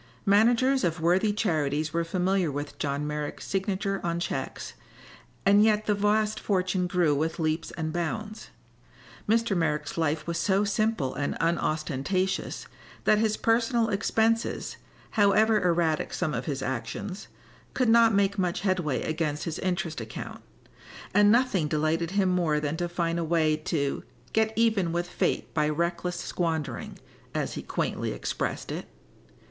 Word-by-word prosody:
Managers 240 +6 +4
of 165 -1 0
worthy 180 +6 +3
charities 155 -7 0
were 170 0 +1
familiar 180 0 0
with 145 +1 -6
John 145 0 -1
Merrick's 150 0 -4
signature 195 0 -1
on 170 0 -1
checks, 155 -6 -4 0.7
and 200 +1 +6
yet 215 -1 +3
the 210 - +2
vast 210 +1 +1
fortune 185 -2 0
grew 175 -4 +2
with 155 +3 -1
leaps 160 0 -1
and 160 -2 -4
bounds. 210 +6 -4 0.8
Mr. 230 -2 +2
Merrick's 155 -2 -1
life 155 -1 0
was 170 0 -2
so 195 +3 +2
simple 210 - 0
and 145 - -2
unostentatious 165 +2 -1 0.4
that 210 - +4
his 215 -1 +1
personal 230 0 +2
expenses, 225 +2 0 0.3
however 215 +1 +4
erratic 170 -3 +1
some 160 -4 -1
of 125 +1 -3
his 135 -3 -3
actions, 130 - -4 0.5
could 255 - +2
not 230 0 +6
make 200 0 +2
much 180 -2 0
headway 180 -8 0
against 155 -2 -2
his 160 -2 -4
interest 180 -6 -2
account, 110 -1 -7 0.7
and 205 +1 +6
nothing 230 -9 +2
delighted 155 +2 0
him 195 0 +1
more 170 -4 +1
than 150 +1 -2
to 175 0 -2
find 170 -1 -1
a - - 0
way 160 -1 +2
to 155 -2 -2 0.3
"get 220 0 +2
even 220 -7 +2
with 175 +1 -1
fate - - -1
by 150 -2 +1
reckless 170 +3 -1
squandering," 160 -8 -3 0.4
as - - -1
he - - -5
quaintly - - -2
expressed - - -3
it. - - -5
175 Hz, 145 wpm, -27 LUFS, 155-205 Hz, 0.8 s, and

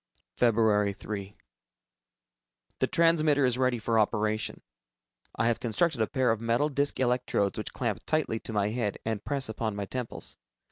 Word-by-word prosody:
Feb. 105 -4 +3
3. 100 -1 -6 1.4
The - - +2
transmitter 155 -4 +3
is 125 0 +1
ready 130 -2 +2
for 115 0 +1
operation. 110 0 0 0.7
I 110 - 0
have 115 -1 +2
constructed 125 +3 +1
a 110 - +2
pair 130 -3 +1
of 110 -1 -1
metal 115 +6 +1
disc 140 -1 0
electrodes 125 -5 +1
which 105 - -5
clamp 110 -7 -2
tightly 155 -8 0
to - - -5
my 105 -1 +1
head 110 -3 -2
and 110 -2 -2
press 140 -2 0
upon 110 -1 -3
my 100 0 -3
temples. 125 +3 -5
115 Hz, 155 wpm, -28 LUFS, 105-130 Hz, 1.4 s, Feb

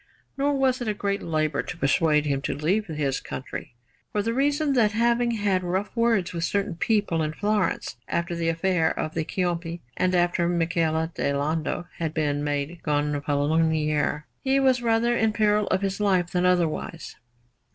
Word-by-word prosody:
Nor 280 +1 +1
was 260 -1 +1
it 240 - -3
a 210 - 0
great 200 0 -1
labour 155 -3 0
to 180 - -7
persuade 150 0 +2
him 140 -2 0
to - - -2
leave 190 +9 0
his 150 -4 -1
country, 130 -1 -7 0.4
for 210 - 0
the 230 +2 -1
reason 285 +2 +1
that, 220 -5 +3
having 235 +2 +2
had 205 -5 +1
rough 185 +6 -2
words 230 -7 +2
with 170 -1 -3
certain 200 +1 0
people 205 -3 +1
in 155 0 -1
Florence 205 - -1
after 170 +1 -1
the 170 -1 -1
affair 165 0 +1
of 155 - -2
the 160 - -1
Ciompi 170 0 -2 0.2
and 185 0 +1
after 175 -1 +2
Michele 165 -2 +1
di 140 - -1
Lando 155 +4 -1
had 160 -2 -2
been 145 -2 0
made 145 +3 -2
Gonfalonier, 150 +1 0 0.2
he 270 0 +3
was 260 -2 +3
rather 235 +1 +2
in 220 -2 +2
peril 210 -1 +2
of 190 - 0
his 195 0 -1
life 185 -4 +2
than 180 0 +2
otherwise. 170 -2 -1
175 Hz, 170 wpm, -25 LUFS, 155-210 Hz, 0.4 s, that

